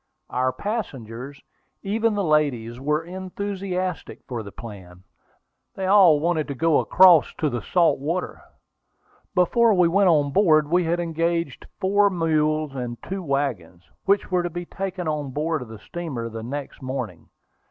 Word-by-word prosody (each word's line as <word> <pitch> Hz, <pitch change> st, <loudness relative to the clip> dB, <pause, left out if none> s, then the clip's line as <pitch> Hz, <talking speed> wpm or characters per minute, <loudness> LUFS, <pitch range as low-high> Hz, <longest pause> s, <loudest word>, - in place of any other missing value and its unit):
Our 130 Hz, +1 st, +1 dB
passengers, 135 Hz, -, -5 dB, 0.4 s
even 220 Hz, +2 st, 0 dB
the 200 Hz, -, 0 dB
ladies, 135 Hz, -8 st, 0 dB
were 150 Hz, +3 st, 0 dB
enthusiastic 185 Hz, -1 st, -4 dB
for 120 Hz, -3 st, -4 dB
the 100 Hz, -2 st, -9 dB
plan. 95 Hz, -6 st, -11 dB, 0.7 s
They 190 Hz, -, -3 dB
all 185 Hz, -6 st, +6 dB
wanted 160 Hz, -1 st, 0 dB
to 140 Hz, -, -4 dB
go 160 Hz, +3 st, +3 dB
across 180 Hz, -5 st, +5 dB
to 150 Hz, -3 st, -1 dB
the 120 Hz, -, -3 dB
salt 175 Hz, -6 st, +2 dB
water. 165 Hz, +6 st, -3 dB, 0.9 s
Before 215 Hz, +5 st, +4 dB
we 180 Hz, -2 st, +4 dB
went 195 Hz, +2 st, +3 dB
on 145 Hz, -4 st, +3 dB
board 155 Hz, -5 st, +3 dB
we 175 Hz, 0 st, +3 dB
had 170 Hz, +2 st, 0 dB
engaged 165 Hz, -3 st, -2 dB
four 200 Hz, +2 st, +3 dB
mules 155 Hz, -4 st, 0 dB
and 120 Hz, -2 st, -4 dB
two 195 Hz, 0 st, -4 dB
wagons, 135 Hz, -, -2 dB, 0.2 s
which 200 Hz, 0 st, +1 dB
were 180 Hz, -1 st, +2 dB
to 175 Hz, -, -2 dB
be 175 Hz, +1 st, -6 dB
taken 185 Hz, -2 st, -5 dB
on 150 Hz, -2 st, -2 dB
board 155 Hz, +2 st, -1 dB
of 125 Hz, -, -7 dB
the 110 Hz, 0 st, -10 dB
steamer 130 Hz, -2 st, -5 dB
the 115 Hz, 0 st, -7 dB
next 140 Hz, +5 st, -6 dB
morning. 130 Hz, -9 st, -5 dB
160 Hz, 155 wpm, -23 LUFS, 135-185 Hz, 0.9 s, all